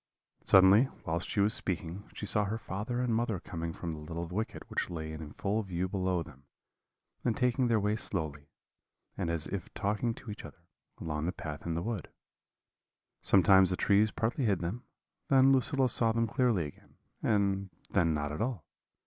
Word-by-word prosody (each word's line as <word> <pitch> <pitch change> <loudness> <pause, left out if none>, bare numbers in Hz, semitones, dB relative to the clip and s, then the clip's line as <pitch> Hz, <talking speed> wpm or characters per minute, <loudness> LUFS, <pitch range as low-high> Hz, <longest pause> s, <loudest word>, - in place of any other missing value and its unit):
"Suddenly, 95 +6 +7 0.2
whilst 85 +1 -2
she 100 - +1
was 105 +2 +3
speaking, 95 -1 -4
she - - -6
saw 105 0 +3
her 105 +3 -2
father 110 +4 -3
and 125 -2 0
mother 115 -4 0
coming 85 -1 -5
from 85 0 -5
the 75 - -7
little 85 +3 -5
wicket 105 +6 -4
which - - -2
lay 80 -2 -5
in 80 -1 -8
full 105 +3 -1
view 95 -2 -2
below 95 -2 0
them, 70 -2 -16 0.8
and 115 -3 0
taking 125 0 +2
their 115 -2 +3
way 105 +1 +1
slowly, 75 -8 -3 0.7
and - - -2
as 85 -2 -1
if - - -5
talking 105 +3 0
to 110 - -9
each 105 - -8
other, 85 - -12 0.4
along 75 0 -3
the - - +1
path 75 -2 -7
in 85 - -1
the 85 - -2
wood. 110 -7 -3 1.1
Sometimes 95 -1 +6
the 90 - +1
trees 105 +2 +4
partly 120 +5 -1
hid 100 -4 +3
them, 100 +9 -4 0.4
then 135 0 +6
Lucilla 135 0 +3
saw 115 -1 +3
them 115 +1 +1
clearly 115 - +1
again, 75 - -13 0.2
and 100 -2 +1 0.2
then 85 -4 +2
not 75 0 -2
at 75 - -4
all. 115 - -2
100 Hz, 185 wpm, -31 LUFS, 85-110 Hz, 1.1 s, Suddenly